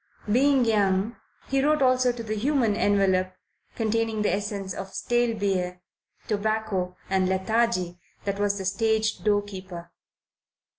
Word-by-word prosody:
Being 265 +2 +4
young, 205 0 +1 0.3
he 270 0 +1
wrote 300 -1 +3
also 255 -1 +4
to 240 -1 -7
the 215 -1 -3
human 235 -1 +1
envelope 190 -3 +2 0.4
containing 225 -1 0
the 205 - +2
essence 200 -1 -3
of 195 0 -7
stale 240 -2 +1
beer, 180 -3 -1 0.4
tobacco 205 -4 -1
and 190 -1 +1
lethargy 190 -2 0 0.3
that 200 0 -2
was 205 0 +1
the 190 - -5
stage 220 +2 +1
doorkeeper. 190 -4 -2
205 Hz, 130 wpm, -26 LUFS, 190-230 Hz, 0.4 s, Being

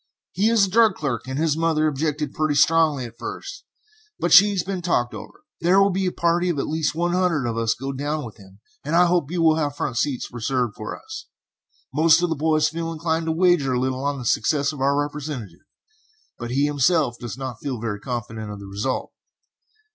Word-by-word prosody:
He 210 +4 +2
is 225 -3 +4
a - - -5
drug 220 -2 +4
clerk, 130 -5 -3
and 130 +1 -4
his 155 -1 +1
mother 160 -1 +1
objected 150 0 -2
pretty 155 -1 0
strongly 155 -3 +3
at 115 0 -12
first, - - -7 0.5
but 175 - 0
she 200 +3 +9
has 195 -4 -1
been 190 -1 -4
talked 125 -8 0
over. - - -11 0.2
There 180 +3 +4
will 195 0 +4
be 190 +1 -1
a - - 0
party 170 +1 +1
of 170 - -1
at 140 - -1
least 155 -1 -1
one 175 +1 0
hundred 180 -7 +1
of 115 -1 -2
us 115 0 0
go 135 +2 -5
down 145 +2 -3
with 115 - -10
him, 100 -1 -17 0.2
and 150 +4 -2
I 180 +1 +6
hope 175 -5 +1
you 170 -1 -1
will 160 -1 +4
have 145 -3 -1
front 120 - -3
seats 130 -1 -2
reserved 120 -1 -1
for 110 - -6
us. 435 0 -9 0.7
Most 165 +3 +4
of 175 - +1
the - - +1
boys 155 0 +2
feel 165 +1 -4
inclined 165 0 -2
to - - +1
wager 165 -5 +2
a 125 - +1
little 130 +1 -2
on 145 0 -1
the 125 - -7
success 145 +5 +1
of 140 - -8
our 140 +1 +2
representative, 145 - -5 0.7
but 120 -1 -5
he 135 +4 +1
himself 145 -2 +1
does 120 0 -6
not 130 -4 -6
feel 130 -4 -4
very 110 -3 -4
confident 110 -2 -5
of 105 -1 -7
the 100 - -10
result. 105 +7 -3
150 Hz, 220 wpm, -23 LUFS, 130-170 Hz, 0.7 s, she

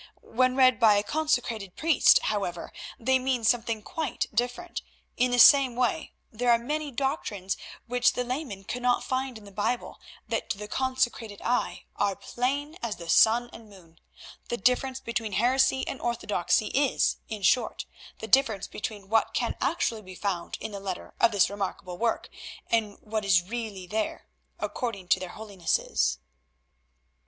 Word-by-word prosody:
When 255 +2 +1
read 255 -2 +5
by 220 -3 +6
a 205 - +2
consecrated 235 -9 -1
priest, 320 -3 +5
however, 195 -5 -2 0.3
they 260 +3 +2
mean 255 -2 -1
something 230 -1 +1
quite 315 -1 -2
different. 245 +10 -2 0.3
In 250 +1 +2
the 245 - +1
same 260 0 +7
way, 245 -2 0 0.2
there 245 +2 -1
are 235 - +6
many 295 +5 -3
doctrines 240 -8 -2 0.3
which 245 0 +2
the 250 - -1
layman 250 -6 -4
cannot 245 +4 0
find 260 -2 -2
in 215 - -14
the 200 - -12
Bible 210 +5 -2 0.3
that - - -2
to - - -1
the 210 +1 -7
consecrated 240 -4 -1
eye 245 +1 -1
are 200 -1 +1
plain 285 - -2
as 230 -4 -2
the 170 -1 -10
sun 240 +2 +5
and 220 -2 -13
the 195 - -13
moon. 165 -2 -22 0.5
The 240 - -1
difference 255 +4 +1
between 230 -4 -3
heresy 260 +5 +2
and 270 - -5
orthodoxy 215 -3 0
is, 280 -1 +2
in 215 -3 -5
short, 250 - +2 0.3
the 220 - -7
difference 225 -6 +3
between 205 -2 -6
what 225 +1 +1
can 240 - 0
actually 275 -6 0
be 185 -2 -11
found 185 -3 -3
in - - -5
the 200 - -6
letter 195 -2 -6
of 235 - +5
this 200 -3 +4
remarkable 190 -3 -5
work, 230 -1 0 0.4
and 215 -3 +1
what 215 0 -3
is 180 -3 +4
really 210 -2 -5
there—according 210 0 -5
to - - +4
their 185 -1 -6
holinesses." 175 - -1
230 Hz, 160 wpm, -27 LUFS, 205-255 Hz, 0.5 s, same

